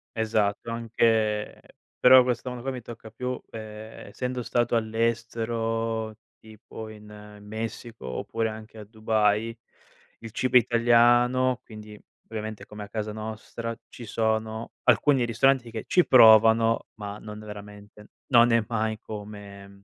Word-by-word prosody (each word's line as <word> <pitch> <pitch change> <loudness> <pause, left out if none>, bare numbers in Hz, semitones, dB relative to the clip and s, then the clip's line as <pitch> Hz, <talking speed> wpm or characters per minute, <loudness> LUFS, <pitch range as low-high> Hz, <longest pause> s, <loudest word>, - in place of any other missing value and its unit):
Esatto. 110 0 0
Anche 110 -2 0 0.4
però, 130 0 +8
questo 125 0 -2
mondo 125 -1 -7
qua 135 - -2
mi 125 - -6
tocca 115 -1 -11
più 125 +2 -4
ehm 110 -1 -8 0.2
essendo 125 +4 -4
stato 120 0 0
all'estero, 115 0 -1 0.2
tipo, 110 0 -11
in 105 -1 -13
Messico 110 - -7
oppure 110 - -2
anche 110 0 -10
a 105 - -9
Dubai, 110 0 0 0.6
il 115 - -9
cibo 125 +3 +3
italiano, 120 +1 +3
quindi, 105 -2 -12 0.3
ovviamente, 110 -1 -6
come 105 0 -9
a 100 - -11
casa 110 -1 -4
nostra, 110 +2 -6
ci 120 - -10
sono 110 0 -2
alcuni 125 +2 +3
ristoranti 120 +1 +2
che 110 -1 -5
ci 180 - +4
provano, 115 -1 +6
ma 105 0 -6
non 105 0 -9
veramente, 105 0 -11 0.2
non 120 -2 +5
è 115 -1 +3
mai 110 -1 -1
come 100 -2 -10
110 Hz, 130 wpm, -26 LUFS, 105-115 Hz, 0.6 s, però